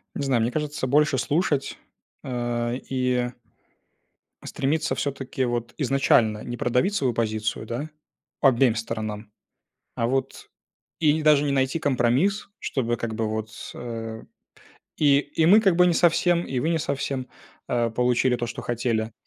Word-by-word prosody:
Не 145 - -3
знаю, 130 -4 +2
мне 115 +2 0
кажется, 150 -2 -2
больше 150 +1 +3
слушать, 145 +2 0 0.5
э, 120 -1 -2
и 125 -2 0 1.2
стремиться, 155 +4 -1
всё-таки, 135 -2 -2
вот 120 -1 -3
изначально 120 -6 +2
не 120 0 -5
продавить 125 - +1
свою 135 -11 +1
позицию, 110 -1 -2
да, 125 +7 -4 0.5
обеим 130 -3 +4
сторонам, 110 -2 -5 0.6
а 115 - 0
вот 135 +2 -2 0.5
И 150 -2 +4
не 155 - -2
даже 150 -1 +5
не 145 - 0
найти 135 +3 +1
компромисс, 140 - +1
чтобы 120 -3 -1
как 115 0 -4
бы 110 0 -1
вот, 110 0 -3
с 115 - -9
э, 115 -2 -6 0.8
и, 140 -2 +5
и 155 +2 0
мы 205 +6 +7
как 195 -5 +3
бы 180 0 +6
не 175 - +3
совсем, 175 +1 +3
и 130 - -3
вы 160 - 0
не 165 - +1
совсем, 135 -2 -3 0.4
э, 120 -1 +1
получили 125 +2 +2
то, 120 - -3
что 120 - -6
хотели. 115 -2 -1
125 Hz, 155 wpm, -24 LUFS, 115-145 Hz, 1.2 s, мы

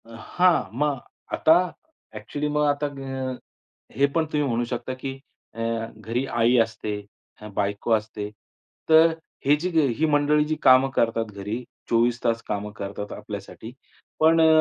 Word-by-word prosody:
अ, - - -18 0.3
हां. 180 -1 +4
मग 145 +2 0 0.3
आता 160 0 +5 0.6
ॲक्चुअली 150 0 -4
मग 150 0 +1
आता 145 +1 +1
अ, 135 -2 -5 0.6
हे 140 +4 +4
पण 165 -1 +2
तुम्ही 150 -1 +1
म्हणू 120 -1 0
शकता 120 +2 -4
की 135 +1 -5 0.4
अ, - - -10 0.4
घरी 115 +5 -2
आई 120 -1 +2
असते, 110 -2 0 0.6
बायको 100 +3 -1
असते. 105 -1 -2 0.6
तर 160 +1 +7
अ, - - -4 0.3
ही 145 +2 +6
जी 175 +4 -2 0.3
ही 160 - +2
मंडळी 150 0 +3
जी 155 +1 -1
कामं 130 +1 +6
करतात 115 0 +1
घरी, 105 +5 -4 0.3
24 120 +1 +2
तास 115 0 +1
कामं 105 0 -3
करतात 100 0 -6
आपल्यासाठी. 105 +2 -8 0.5
पण 165 +1 +5
अ, 160 - +6
130 Hz, 150 wpm, -24 LUFS, 110-150 Hz, 0.6 s, तर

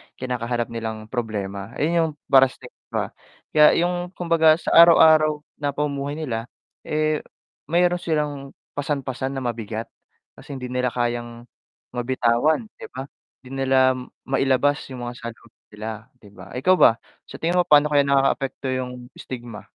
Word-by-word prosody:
kinakaharap 120 -2 -3
nilang 110 -1 -5
problema. 105 -3 -4
Ayun 160 +4 0
yung 160 -1 +1 0.2
para 135 0 +7
sa 130 - -16
iba. 125 - -5 0.5
Kaya 150 -1 +6
yung 175 0 -1
kumbaga 165 -2 +4
sa 170 - -4
araw-araw 155 -2 +6 0.2
na 145 -1 -2
pamumuhay 145 -1 -2
nila, 120 -7 -4 0.4
eh 155 0 +1 0.5
meron 175 +2 +2
silang 150 -4 -3 0.2
pasan-pasan 135 -2 -3
na 135 - -4
mabigat, 115 -2 -4 0.5
kasi 140 - -9
hindi 125 -1 -6
nila 125 0 0
kayang 120 -1 -3 0.5
mabitawan, 125 - +1
'di - - -8
ba? 130 - -4 0.4
Hindi 125 - -13 0.2
nila 130 -1 +4 0.3
mailabas 135 +1 +2
yung 125 -1 -6
mga 120 - -6
saloobin 115 0 -11
nila 110 +1 -5 0.3
'di 105 - -16
ba? 95 -2 -13
Ikaw 185 +9 +3
ba? - - +8 0.4
Sa - - -10
tingin 175 +2 0
mo, 175 - +2
paano 150 0 +5
kaya 145 -1 +5
nakakaapekto 135 -1 +1
yung 125 -1 -5
stigma? 120 -4 -8
130 Hz, 145 wpm, -23 LUFS, 120-150 Hz, 0.5 s, ba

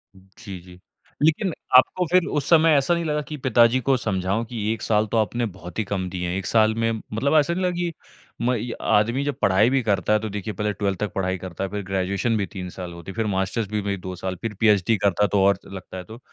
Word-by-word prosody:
जी, 95 0 -11
जी। 90 0 -15 0.4
लेकिन 160 +5 +2 0.3
आपको 180 +7 +3
फिर 180 -2 +4
उस 140 - -1
समय 165 -1 +6
ऐसा 140 +5 +2
नहीं 170 0 0
लगा 150 -1 0
कि 150 0 -7
पिताजी 125 -1 +4
को 135 +2 +2
समझाऊँ 100 0 -1
कि 115 -1 -6
1 115 - -7
साल 105 -1 +2
तो 115 - +1
आपने 115 +3 0
बहुत 95 -2 -8
ही - - +2
कम 95 -2 -3
दिए 90 -1 -3
हैं। 90 - -2
1 95 - -4
साल 110 -1 +3
में 115 0 +1
मतलब 115 +6 -2
ऐसा 150 +3 +1
नहीं 185 +2 -2
लगा 180 - +2
कि 175 -1 -1 0.5
म 125 +2 +2
इ 120 +1 -4
आदमी 115 +6 +2
जब 145 -2 -1
पढ़ाई 100 +4 +4
भी 135 0 +2
करता 105 0 +1
है, 110 - +4
तो 110 0 -4
देखिए, 105 +1 -5
पहले 105 0 -1
12th 100 -2 -2
तक 105 -3 -2
पढ़ाई 95 -1 -1
करता 95 0 -6
है 95 - -2
फिर 105 +1 -4
ग्रेजुएशन 100 +4 0
भी 100 - 0
3 95 -2 -7
साल 90 -1 -7
होती 85 +2 -9
है, - - -13
फिर 115 0 -1
मास्टर्स 95 +3 -1
भी 105 -1 -1
में 100 -1 -3
2 95 0 -6
साल, 95 +1 -4
फिर 115 -2 -3
पीचडी 105 0 +3
करता 100 +1 +2
तो 100 0 +2
और 100 0 +3
लगता 95 -1 -9
है। 90 - -6
तो 110 +6 -12
105 Hz, 255 wpm, -23 LUFS, 95-120 Hz, 0.5 s, समय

